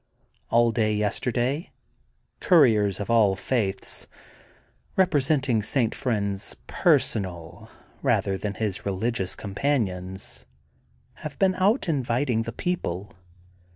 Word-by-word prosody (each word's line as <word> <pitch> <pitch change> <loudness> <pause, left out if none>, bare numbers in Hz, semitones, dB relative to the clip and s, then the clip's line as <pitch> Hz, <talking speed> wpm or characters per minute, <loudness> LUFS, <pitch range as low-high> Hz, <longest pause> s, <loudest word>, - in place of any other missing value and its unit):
All 120 0 +4
day 110 -2 +1
yesterday 125 - -1 0.7
couriers 110 - +4
of 105 +2 -3
all 105 -4 +4
faiths, 100 -1 -2 0.9
representing 140 - +2
St. 115 +2 +1
Friend 105 -5 -1
*s 100 - -3
personal 85 -6 0 0.3
rather 95 - +1
than 100 +1 -4
his 105 -4 -2
religious 100 0 -1
companions, 100 -5 -2 0.7
have 150 -2 -6
been 190 -1 +3
out 200 +7 +2
invi 135 -6 0
ting 120 -5 +1
the 115 - -4
people. 105 - -3
115 Hz, 105 wpm, -25 LUFS, 100-135 Hz, 0.9 s, All